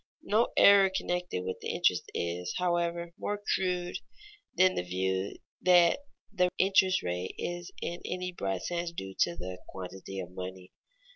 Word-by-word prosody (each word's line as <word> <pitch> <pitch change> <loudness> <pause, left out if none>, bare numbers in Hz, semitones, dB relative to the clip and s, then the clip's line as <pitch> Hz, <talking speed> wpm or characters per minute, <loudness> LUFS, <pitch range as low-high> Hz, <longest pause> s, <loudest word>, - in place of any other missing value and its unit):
No 220 +3 +3
error 200 -1 +8
connected 180 - -2
with 95 - -4
interest - - +1
is, 85 +1 -2
however, 170 -1 0
more 205 0 -2 0.2
crude 180 -1 -1 0.6
than 185 0 +6
the - - -1
view 95 +2 -2 0.2
that 175 +1 +6 0.3
the 180 -3 +3
interest 190 -1 +4
rate 90 +1 -3
is 175 0 -4
in 175 +1 -4
any 180 0 -3
broad 95 - -3
sense 175 -1 -2
due 95 -12 -6
to 85 - +3
the 90 +1 -6
quantity 95 +1 -7
of 90 -1 -6
money. 90 0 -7
170 Hz, 145 wpm, -30 LUFS, -, 0.6 s, error